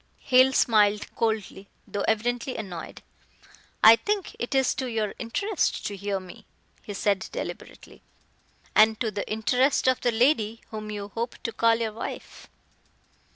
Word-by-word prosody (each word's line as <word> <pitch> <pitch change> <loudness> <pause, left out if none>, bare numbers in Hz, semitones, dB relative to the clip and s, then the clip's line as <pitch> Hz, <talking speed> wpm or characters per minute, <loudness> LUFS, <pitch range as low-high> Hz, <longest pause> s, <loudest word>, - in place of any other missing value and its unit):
Hale 255 0 +5
smiled 210 -5 +2
coldly, 215 -3 -2 0.2
though 205 - -4
evidently 245 +3 -1
annoyed. 180 -7 -7 0.8
"I 225 +1 +10
think 405 - -2
it 240 +3 -3
is 265 -1 +3
to 260 -1 -4
your 220 -4 -2
interest 395 - -1
to 205 - -3
hear 200 0 -3
me," 185 -1 -13 0.3
he 205 - -8
said 200 -1 0
deliberately, - - -8 0.7
"and 220 0 +5
to 225 - -1
the 205 0 -5
interest 250 +6 +1
of 260 -1 +2
the 240 - +2
lady 230 -2 +1
whom 215 -1 -6
you 205 -1 -5
hope 230 +3 -4
to 230 - -2
call 230 0 +3
your 225 -2 -3
wife." 225 - -8
225 Hz, 150 wpm, -26 LUFS, 210-250 Hz, 0.8 s, I